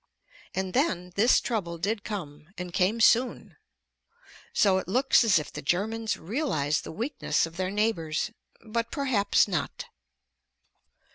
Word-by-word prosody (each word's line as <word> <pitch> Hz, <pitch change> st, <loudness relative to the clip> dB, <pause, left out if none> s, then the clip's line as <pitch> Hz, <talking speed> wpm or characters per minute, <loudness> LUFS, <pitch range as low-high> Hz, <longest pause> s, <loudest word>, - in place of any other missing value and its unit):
And 190 Hz, -1 st, -2 dB
then 180 Hz, -, 0 dB
this 220 Hz, +7 st, +4 dB
trouble 180 Hz, -8 st, -3 dB
did 205 Hz, +5 st, -2 dB
come, 155 Hz, -7 st, -7 dB
and 180 Hz, -1 st, -6 dB
came 190 Hz, +6 st, +1 dB
soon. 240 Hz, +3 st, +2 dB, 0.9 s
So 190 Hz, -2 st, +3 dB
it -, -, -7 dB
looks 255 Hz, +6 st, +4 dB
as 220 Hz, -6 st, +4 dB
if 150 Hz, -, -4 dB
the -, -, -6 dB
Germans 215 Hz, +8 st, -1 dB
realized 165 Hz, -, -1 dB
the -, -, -7 dB
weakness 230 Hz, -, -1 dB
of 165 Hz, 0 st, -11 dB
their 185 Hz, +1 st, -2 dB
neighbors. 200 Hz, -4 st, -1 dB, 0.3 s
But 230 Hz, +1 st, -2 dB
perhaps 255 Hz, -10 st, +2 dB
not. 185 Hz, -4 st, -3 dB
200 Hz, 135 wpm, -27 LUFS, 175-225 Hz, 0.9 s, this